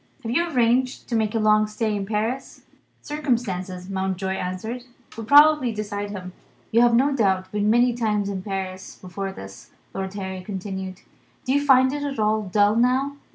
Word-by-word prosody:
Have 225 Hz, -, -3 dB
you 340 Hz, +7 st, +1 dB
arranged 250 Hz, -2 st, +1 dB
to 235 Hz, -, -1 dB
make 220 Hz, -1 st, 0 dB
a -, -, +3 dB
long 215 Hz, 0 st, +4 dB
stay 215 Hz, 0 st, -2 dB
in 195 Hz, -1 st, -3 dB
Paris?" 225 Hz, +5 st, -3 dB, 0.4 s
Circumstances, 200 Hz, -11 st, -2 dB
Mountjoy 190 Hz, 0 st, -2 dB
answered, 190 Hz, +7 st, -4 dB, 0.3 s
would 225 Hz, -1 st, -7 dB
probably 295 Hz, -2 st, +6 dB
decide 205 Hz, -1 st, -4 dB
him. 185 Hz, -3 st, -7 dB, 0.4 s
"You 230 Hz, -, +4 dB
have 240 Hz, -1 st, +5 dB
no 275 Hz, +3 st, +3 dB
doubt 190 Hz, -6 st, +1 dB
been 210 Hz, 0 st, 0 dB
many 240 Hz, +2 st, +4 dB
times 210 Hz, -4 st, 0 dB
in 195 Hz, -2 st, -3 dB
Paris 190 Hz, -1 st, -5 dB
before 195 Hz, +1 st, -6 dB
this," 95 Hz, -, -11 dB, 0.2 s
Lord 190 Hz, 0 st, -5 dB
Harry 190 Hz, -2 st, -5 dB
continued. 190 Hz, -1 st, -6 dB, 0.4 s
"Do 260 Hz, -, +1 dB
you 285 Hz, 0 st, +2 dB
find 260 Hz, -1 st, +5 dB
it 290 Hz, -, -3 dB
at 285 Hz, -1 st, -3 dB
all 215 Hz, 0 st, +1 dB
dull, 205 Hz, +1 st, +2 dB
now?" 260 Hz, +4 st, +1 dB
215 Hz, 175 wpm, -23 LUFS, 190-245 Hz, 0.4 s, probably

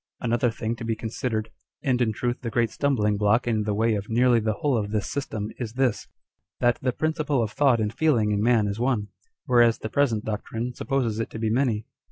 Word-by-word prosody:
Another 120 Hz, +1 st, +1 dB
thing 115 Hz, 0 st, -3 dB
to -, -, -7 dB
be 115 Hz, -1 st, -1 dB
considered, 110 Hz, 0 st, -3 dB, 0.3 s
and 125 Hz, -3 st, +1 dB
in 115 Hz, -2 st, +2 dB
truth 120 Hz, +3 st, -2 dB
the 120 Hz, -, -3 dB
great 115 Hz, -1 st, +1 dB
stumbling 105 Hz, -8 st, +1 dB
block 105 Hz, +3 st, +2 dB
in 110 Hz, -3 st, 0 dB
the 105 Hz, -, 0 dB
way 110 Hz, +1 st, +2 dB
of 105 Hz, -1 st, -3 dB
nearly 120 Hz, +1 st, +4 dB
the 110 Hz, 0 st, 0 dB
whole 145 Hz, +1 st, 0 dB
of 105 Hz, -3 st, -1 dB
this 105 Hz, -2 st, -1 dB
system, 110 Hz, -7 st, -4 dB
is 115 Hz, -3 st, -4 dB
this, 125 Hz, -3 st, 0 dB, 0.5 s
that 120 Hz, 0 st, +2 dB
the 130 Hz, -, +1 dB
principle 155 Hz, -2 st, 0 dB
of 110 Hz, -, -3 dB
thought 135 Hz, -3 st, +3 dB
and 105 Hz, 0 st, -1 dB
feeling 120 Hz, -8 st, +2 dB
in 105 Hz, 0 st, +1 dB
man 115 Hz, -1 st, +3 dB
is 100 Hz, +1 st, -3 dB
one, 120 Hz, -5 st, 0 dB, 0.4 s
whereas 120 Hz, -2 st, +4 dB
the 110 Hz, -, -5 dB
present 120 Hz, -7 st, +1 dB
doctrine 110 Hz, +3 st, -3 dB
supposes 120 Hz, -5 st, -1 dB
it 115 Hz, -, -2 dB
to -, -, -8 dB
be 110 Hz, -1 st, -1 dB
many. 115 Hz, -3 st, +1 dB
115 Hz, 220 wpm, -25 LUFS, 110-125 Hz, 0.5 s, nearly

